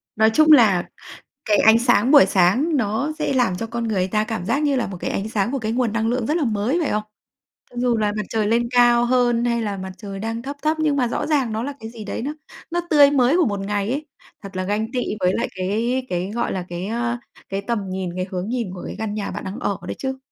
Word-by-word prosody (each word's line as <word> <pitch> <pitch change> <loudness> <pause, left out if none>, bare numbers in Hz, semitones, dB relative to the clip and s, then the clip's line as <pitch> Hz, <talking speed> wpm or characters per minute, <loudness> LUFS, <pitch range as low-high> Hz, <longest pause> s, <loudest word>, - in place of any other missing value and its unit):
Nói 220 +1 +4
chung 310 +7 +4
là 215 -11 +6 0.6
cái 210 - +3
ánh 220 +1 +6
sáng 240 0 +3
buổi 285 -9 +8
sáng 200 - +2
nó 245 +5 0
sẽ - - 0
làm 245 -9 +1
cho 225 - -4
con 230 0 -3
người 190 -4 0
ta 215 +2 +1
cảm 215 -5 -4
giác 280 +10 0
như 285 -2 +2
là 250 - 0
một 190 - -7
cái - - -3
ánh 200 +2 -2
sáng 210 0 0
của 275 - -1
cái 220 -2 -2
nguồn 240 -2 0
năng 225 0 0
lượng 240 -1 -1
rất 300 - +1
là 330 - +1
mới, 225 +6 0
phải 300 - -1
không? 210 - 0 0.7
Cho - - -18
dù 245 -2 +2
là 210 -1 +1
mặt 210 - -2
trời 215 -2 0
lên 235 +2 +2
cao 240 -1 +5
hơn 240 -1 +2
hay 235 -1 +1
là 205 -3 -3
mặt 190 0 -6
trời 200 -2 -7
đang 225 +2 -3
thấp 275 +3 -6
thấp, 310 +1 +1
nhưng 305 -2 +2
mà 255 -3 +1
rõ 235 - -2
ràng 280 -7 +1
nó 220 +1 -2
là 285 +2 -4
cái 220 - -7
gì 225 -2 -9
đấy 205 - -4
nó 285 +5 -3 0.4
nó 345 +1 0
tươi 290 -3 +6
mới 270 +2 +3
của 355 - +4
một 205 -3 -1
ngày 200 +2 -2
ấy, 290 +4 -3 0.4
thật 195 -1 -9
là 185 - -1
ganh 210 +4 -2
tị 255 - -1 0.2
với 180 0 +2
lại - - -1
cái 225 +8 -1
cái, 180 +2 -2
gọi 240 - -1
là, 185 -2 -3
cái, 175 +2 -4
ơ, 235 +2 -1 0.3
cái 195 +1 -2
tầm 235 +1 -1
nhìn, 185 -1 -3
cái 185 0 -2
hướng 185 +2 -3
nhìn 240 -3 -2
của 180 - -8
cái - - -6
căn 220 -1 -3
nhà 210 -1 -3
bạn - - -6
đang 195 +5 -6
ở 200 -5 -1
đấy - - -4
chứ, 265 0 -3
225 Hz, 270 wpm, -22 LUFS, 200-255 Hz, 0.7 s, buổi